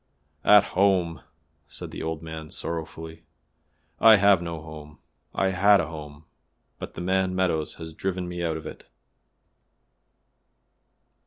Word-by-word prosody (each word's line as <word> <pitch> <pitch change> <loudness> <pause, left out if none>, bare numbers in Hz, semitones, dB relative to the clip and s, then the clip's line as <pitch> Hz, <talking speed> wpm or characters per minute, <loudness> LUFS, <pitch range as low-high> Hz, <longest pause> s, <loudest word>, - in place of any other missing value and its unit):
"At 105 -1 +7
home!" 90 -5 +2 0.5
said - - -8
the - - -7
old 80 0 -4
man 80 -1 -8
sorrowfully; 80 0 -6 0.8
"I 110 -1 +8
have 100 -3 +4
no 85 -2 -5
home. 75 -1 -11 0.3
I 95 - 0
had 100 +2 +5
a 85 - 0
home, 75 -1 -10 0.5
but - - -8
the - - -6
man 95 +1 0
Meadows 85 -4 0
has 80 -1 -9
driven 90 +1 -3
me 90 0 -5
out 80 -2 -1
of 80 - -10
it." - - -10
85 Hz, 135 wpm, -25 LUFS, 80-95 Hz, 0.8 s, I